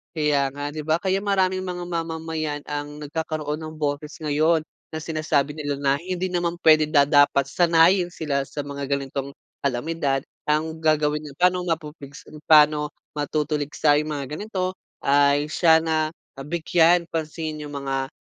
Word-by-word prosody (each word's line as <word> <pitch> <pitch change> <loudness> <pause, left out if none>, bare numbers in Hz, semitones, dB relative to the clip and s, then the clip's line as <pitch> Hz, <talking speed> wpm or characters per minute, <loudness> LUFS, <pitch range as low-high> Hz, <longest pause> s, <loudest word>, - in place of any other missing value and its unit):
Kaya 145 -3 +1
nga, 145 +1 -5
di 155 - -4
ba? 160 +2 +1
Kaya 190 +1 0
maraming 190 -2 +1
mga 180 -1 -5
mamamayan 160 -3 -3
ang 145 0 -5
nagkakaroon 150 0 -3
ng 155 0 -8
boses 150 0 -2
ngayon 155 +2 +2 0.3
na 160 - -4
sinasabi 155 -2 -1
nila 145 -2 -3
na 140 -1 +2
hindi 185 0 -2
naman 175 -1 -2
pwede, 155 -1 +7
da 145 -2 +3
dapat 145 -2 +4
sanayin 175 +3 +3
sila 140 -5 -2
sa 135 - -9
mga 140 -1 -5
ganitong 140 0 -2 0.3
kalamidad. 140 +1 0 0.3
Ang 160 +1 -1
gagawin 150 -1 +2
ay 140 - -16
pa'no 180 0 +3
mapupuligsa 150 -4 -5 0.2
paano 150 -1 +5 0.2
matutuligsa 150 0 0
yung 155 - -5
mga 145 0 -4
ganito, 185 -2 -3 0.2
ay 145 +1 +3
siya 160 0 +4
na 160 -1 0 0.2
nabigyan 170 +4 +2
pansin 155 -1 -4
yung 145 - -8
mga, 135 -1 -3
155 Hz, 150 wpm, -23 LUFS, 145-165 Hz, 0.3 s, pwede